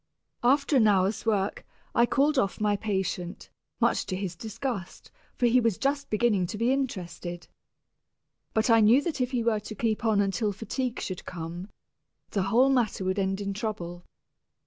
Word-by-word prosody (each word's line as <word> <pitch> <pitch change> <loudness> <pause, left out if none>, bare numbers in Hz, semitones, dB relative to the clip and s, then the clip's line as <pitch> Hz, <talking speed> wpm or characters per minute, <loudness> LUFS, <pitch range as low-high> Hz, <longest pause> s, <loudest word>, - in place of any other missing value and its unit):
After 280 +3 +3
an 220 -4 +5
hour's 200 +2 +2
work, 205 -2 0 0.3
I 235 - +4
called 285 +2 +2
off 195 - -1
my 210 -1 +2
patient, 190 -3 -3 0.3
much - - +2
to 185 - -2
his 185 -2 -4
disgust, 220 0 -5 0.2
for 245 - +1
he 245 +1 +5
was 230 -5 +1
just 280 +1 -1
beginning 215 -4 +2
to 210 - -5
be 235 +4 +2
interested. 175 -9 -4 1.1
But 220 +2 +3
I 225 - +7
knew 230 +6 +5
that 320 -6 -2
if 250 - +1
he 250 -3 -1
were 225 -2 +2
to 215 +1 -8
keep 220 +1 -1
on 220 -3 +3
until 205 +1 0
fatigue 235 +4 -3
should 185 -2 -5
come, 175 +2 -6 0.6
the 200 - 0
whole 250 +6 +5
matter 235 -7 +1
would 185 +2 0
end 195 +1 -1
in 200 0 -2
trouble. 175 -5 -5
215 Hz, 170 wpm, -27 LUFS, 190-240 Hz, 1.1 s, I